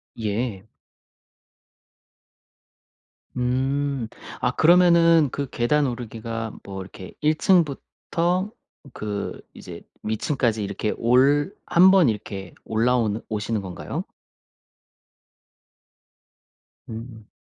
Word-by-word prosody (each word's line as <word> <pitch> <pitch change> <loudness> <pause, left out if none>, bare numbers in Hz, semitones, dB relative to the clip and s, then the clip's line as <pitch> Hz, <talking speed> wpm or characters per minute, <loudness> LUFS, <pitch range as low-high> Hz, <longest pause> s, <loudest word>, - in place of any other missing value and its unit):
예. 110 -2 -3 2.7
음. 130 +1 -1 0.3
아 - - +2
그러면은 170 -2 +5
그 140 -2 -4
계단 145 +5 +1
오르기가 115 -2 -5
뭐 95 -1 -7
이렇게 95 0 -10
1 155 +1 +2
층부터 175 +3 0 0.4
그 105 -1 -5
이제 - - -10 0.2
위층까지 110 0 0
이렇게 100 +2 -2
올 140 - +3 0.2
1 185 +2 +7
번 190 -6 +5
이렇게 100 -4 -4
올라오는 115 -1 +1
오시는 105 0 -2
건가요? 95 -2 -5 2.8
음. 110 -1 -9
120 Hz, 160 characters per minute, -24 LUFS, 110-150 Hz, 2.8 s, 1